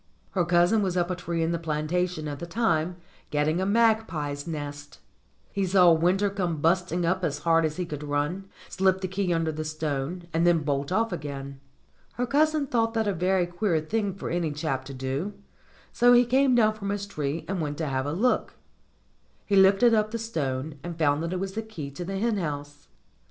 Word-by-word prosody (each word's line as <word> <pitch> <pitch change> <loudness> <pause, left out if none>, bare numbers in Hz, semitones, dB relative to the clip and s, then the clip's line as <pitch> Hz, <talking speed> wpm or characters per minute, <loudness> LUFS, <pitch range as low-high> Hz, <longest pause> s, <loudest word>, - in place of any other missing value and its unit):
Her 180 -3 +1
cousin 175 +5 +3
was 185 -2 -1
up 175 0 +1
a - - -1
tree 170 -2 -2
in 165 - 0
the 170 - -1
plantation 160 +1 -1
at 145 -2 -5
the 170 - -6
time, 170 -4 0 0.3
getting 150 +4 +1
a 190 - 0
magpie's 200 -10 +1
nest. 145 -2 -6 0.5
He 200 - -1
saw 180 -2 +5
Winter 180 +5 +2
come 180 -5 -2
busting 175 +2 +1
up 185 +2 0
as 145 -4 0
hard 165 -1 +4
as 155 +1 -3
he 180 - -2
could 150 -3 -6
run, 150 +6 -2 0.2
slip 190 0 +1
the 185 - -1
key 190 -1 -1
under 165 -1 +1
the 155 0 -4
stone, 155 +2 -3
and 165 +1 +2
then 170 -3 +3
bolt 140 0 -1
off 225 +3 +1
again. 140 -3 -6 0.5
Her 245 - -1
cousin 305 +2 +2
thought 230 -3 0
that 220 -1 +1
a 200 - +1
very 180 +1 +1
queer 175 -1 0
thing 200 +4 -2
for 195 - -5
any 170 -2 0
chap 145 -3 -3
to 135 - -8
do, 135 +10 -3 0.6
so 245 0 +5
he 245 0 +6
came 260 +1 +3
down 215 -2 +4
from 200 -2 -5
his 200 0 -2
tree 150 -5 -3
and 190 -2 -2
went 145 -1 -3
to 160 - -2
have 135 -1 -1
a - - -1
look. 225 +11 0 0.9
He 200 - +1
lifted 195 +5 +6
up 215 -1 +2
the 230 - -3
stone 150 - -3
and 170 -1 -6
found 145 -2 +2
that 165 +1 -3
it 185 - -2
was 195 0 -3
the 220 - -2
key 195 -11 -7
of 170 +5 -7
the 195 0 -3
hen 225 +1 0
house. 145 -4 -5
175 Hz, 210 wpm, -26 LUFS, 150-200 Hz, 0.9 s, he